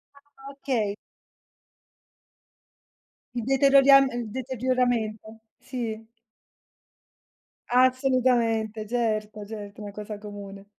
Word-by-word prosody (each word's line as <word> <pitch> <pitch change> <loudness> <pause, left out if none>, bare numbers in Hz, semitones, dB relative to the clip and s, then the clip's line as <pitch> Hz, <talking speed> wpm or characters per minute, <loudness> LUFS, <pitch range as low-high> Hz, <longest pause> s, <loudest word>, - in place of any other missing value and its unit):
Ah, 280 -1 -14
okay. 245 -7 -2 2.4
Il 240 -2 -3
deterioriam 275 0 +6
il 240 -2 -4
deterioramento, 245 -3 -2 0.2
sì. 225 -4 -5 1.6
Assolutamente, 245 -4 +2
certo, 215 -3 -2
certo 205 -1 -9
è - - -7
una 205 - -7
cosa 210 0 -7
comune. 200 -1 -10
230 Hz, 80 wpm, -26 LUFS, 215-260 Hz, 2.4 s, deterioriam